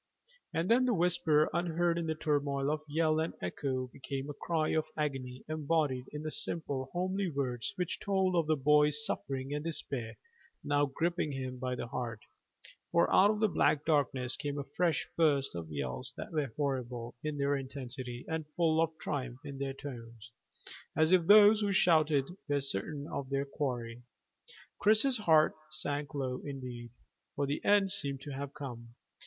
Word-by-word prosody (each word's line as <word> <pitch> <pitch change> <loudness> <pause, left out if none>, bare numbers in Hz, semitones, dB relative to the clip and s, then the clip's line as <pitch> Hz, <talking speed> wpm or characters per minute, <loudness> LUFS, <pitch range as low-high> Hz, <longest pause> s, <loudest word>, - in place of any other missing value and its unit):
And 165 +2 -1
then 245 +4 +4
the 245 -3 +2
whisper, 165 -3 +3
unheard 170 0 +1
in 165 - -3
the 160 - 0
turmoil 145 -2 0
of 155 0 -1
yell 155 +1 +2
and 160 - -2
echo, 130 +8 -2
became 135 +1 -5
a - - -7
cry 155 +1 -1
of 155 -1 +1
agony 135 -4 -3
embodied 150 -4 0
in 150 0 -6
the 155 - -3
simple 140 -6 -2
homely 185 +2 -1
words 130 -3 -2
which 180 -3 -2
told 190 -2 +1
of 165 -3 +2
the 155 - +3
boy's 150 +1 +3
suffering 135 0 -3
and 150 0 -2
the 165 - -2
despair 125 -7 -3 0.5
now 145 0 +2
gripping 160 +2 -1
him 130 -1 -4
by 125 0 -2
the - - -4
heart, 115 -2 -4 0.7
for 170 - +3
out 200 +2 +7
of 215 0 0
the 215 - +5
black 155 -5 +2
darkness 135 -5 +1
came 145 0 -4
a 140 - -2
fresh 170 -5 +1
burst 145 -5 +2
of 85 -2 -6
yells 65 -4 -4
that - - -6
were 150 -6 -1
horrible 125 -4 -2
in 150 -1 -2
their 140 0 +1
intensity, 130 -2 -6
and 160 -1 -3
full 160 -2 +3
of 165 - +3
triumph 130 -2 -4
in 140 -2 -7
their 135 -1 -3
tones, 120 -4 -9 0.7
as 160 +1 +4
if 180 -3 +4
those 210 +1 +8
who 205 -1 +1
shouted 155 -6 +4 0.2
were 145 0 +2
certain 140 +2 -3
of 135 -4 -4
their 140 0 0
quarry. 120 -5 -3 0.8
Chris's 220 +4 +4
heart 160 -6 +5 0.2
sank 145 -1 -2
low 130 -2 -2
indeed, 125 -4 -6 0.5
for 140 - 0
the 140 +2 -2
end 200 -2 +4
seemed 140 -5 +1
to 145 - -7
have 140 0 -5
come. 120 -5 -8
145 Hz, 175 wpm, -32 LUFS, 130-160 Hz, 0.8 s, those